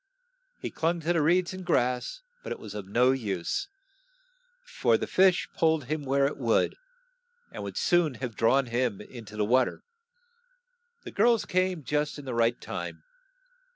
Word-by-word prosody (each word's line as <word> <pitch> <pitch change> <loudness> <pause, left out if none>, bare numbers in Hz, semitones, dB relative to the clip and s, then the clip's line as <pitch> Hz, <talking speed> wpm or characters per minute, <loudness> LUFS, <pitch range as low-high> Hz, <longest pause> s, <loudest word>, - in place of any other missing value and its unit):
He - - -5
clung 170 +2 0
to 165 +2 +1
the 165 - +2
reeds 175 +4 +2
and 185 0 -7
grass, 125 - 0 0.2
but - - -7
it - - -3
was 105 -2 -9
of 105 -2 -6
no 125 +6 +4
use, 110 - -2 1.0
for - - +1
the - - -3
fish 185 -1 +3
pulled 160 -2 +2
him 150 +3 -3
where 140 +1 +2
it 140 - -2
would, 115 -4 +2 0.8
and - - -7
would - - -6
soon 175 -6 +2
have 120 -1 -5
drawn 130 +5 +3
him 120 -3 -1
in 115 +2 -10
to 105 +1 -11
the 105 - +1
wa 125 +3 +4
ter. - - -8 1.2
The - - -8
girls 235 -3 +3
came 185 -3 0
just 150 +2 -1
in 145 - -9
the 130 - -4
right 115 0 +2
time. - - -6
135 Hz, 175 wpm, -28 LUFS, 120-170 Hz, 1.2 s, no